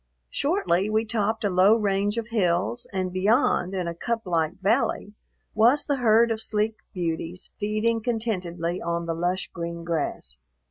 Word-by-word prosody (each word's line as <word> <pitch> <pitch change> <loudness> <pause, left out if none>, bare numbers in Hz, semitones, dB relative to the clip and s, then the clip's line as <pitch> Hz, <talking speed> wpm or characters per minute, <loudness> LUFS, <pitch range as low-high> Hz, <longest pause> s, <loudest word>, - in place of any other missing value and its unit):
Shortly, 280 - +1
we 220 +1 +1
topped 220 0 -1
a - - +2
low 185 +4 +5
range 205 0 0
of 230 0 -3
hills, 195 +2 0
and 185 -2 -2
beyond, 190 -1 +2
in 180 -2 -2
a 170 - -2
cuplike 175 -6 -1
valley, 205 0 0 0.4
was 240 +7 +4
the 285 -2 0
herd 230 -1 +4
of 220 -1 0
sleek 215 0 -1
beauties 170 0 -4
feeding 215 +2 0
contentedly 185 -7 -2
on 170 0 -2
the 165 - -1
lush 175 +3 -2
green 170 -1 -5
grass. 150 - -3
200 Hz, 150 wpm, -25 LUFS, 175-225 Hz, 0.4 s, low